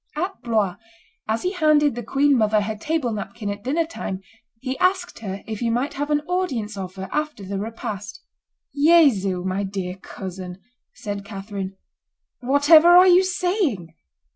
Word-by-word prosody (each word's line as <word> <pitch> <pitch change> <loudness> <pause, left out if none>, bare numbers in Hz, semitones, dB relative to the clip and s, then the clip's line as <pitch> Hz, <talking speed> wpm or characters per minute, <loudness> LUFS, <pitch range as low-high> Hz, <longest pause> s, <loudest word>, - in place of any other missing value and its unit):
At 360 -1 -3
Blois, 215 -7 0 0.5
as 220 +1 -1
he 365 - 0
handed 305 -5 +3
the 240 - -5
queen 275 +5 +2
mother 215 -2 +3
her 215 +1 -3
table 285 +2 -1
napkin 210 0 -5
at 205 0 -7
dinner 310 +6 0
time, 195 - -5 0.4
he 260 +2 -3
asked 365 -1 +1
her 195 -3 -6
if 220 -2 -5
he 235 - 0
might 250 +6 -1
have 290 +1 -3
an 295 0 +2
audience 290 - -2
of 190 -1 -6
her 190 0 -6
after 300 -8 -3
the 195 +1 -4
repast. 205 -2 -6 0.5
"Jesu! 275 - +4
my 190 +1 -1
dear 190 -2 -4
cousin," 185 -1 -8 0.4
said 205 -3 -5
Catherine, 195 -1 -6 0.6
"whatever 285 +5 +6
are 355 +1 +8
you 365 0 +6
saying?" 355 - -1
230 Hz, 160 wpm, -23 LUFS, 200-305 Hz, 0.6 s, are